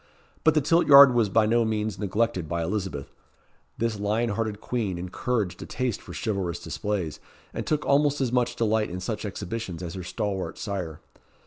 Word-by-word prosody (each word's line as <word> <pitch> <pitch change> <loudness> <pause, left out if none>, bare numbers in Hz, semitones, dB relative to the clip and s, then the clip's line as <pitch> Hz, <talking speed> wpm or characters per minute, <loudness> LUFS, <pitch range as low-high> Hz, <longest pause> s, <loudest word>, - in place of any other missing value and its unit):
But 160 -1 +4
the 155 - +4
tilt 165 +5 +3
yard 140 -2 +10
was 115 -4 +2
by 110 +3 +4
no 115 +2 +3
means 110 -1 -2
neglected 100 -4 -1
by 85 +1 -1
Elizabeth. 95 -6 -3 0.7
This 115 -2 -1
lion 110 +3 0
hearted 110 0 -2
queen 110 -8 -2
encouraged 90 +2 -2
a - - -7
taste 125 -4 -2
for - - -11
chivalrous 95 -6 -2
displays, 100 -7 -3 0.3
and - - -4
took 150 -1 0
almost 145 0 +3
as 130 -3 0
much 125 -1 +1
delight 110 -1 +1
in 90 +1 -5
such 105 +4 -4
exhibitions 100 -3 -5
as 85 -1 -5
her 95 - -5
stalwart 95 +1 -3
sire. 90 -6 -4
105 Hz, 180 wpm, -26 LUFS, 95-120 Hz, 0.7 s, yard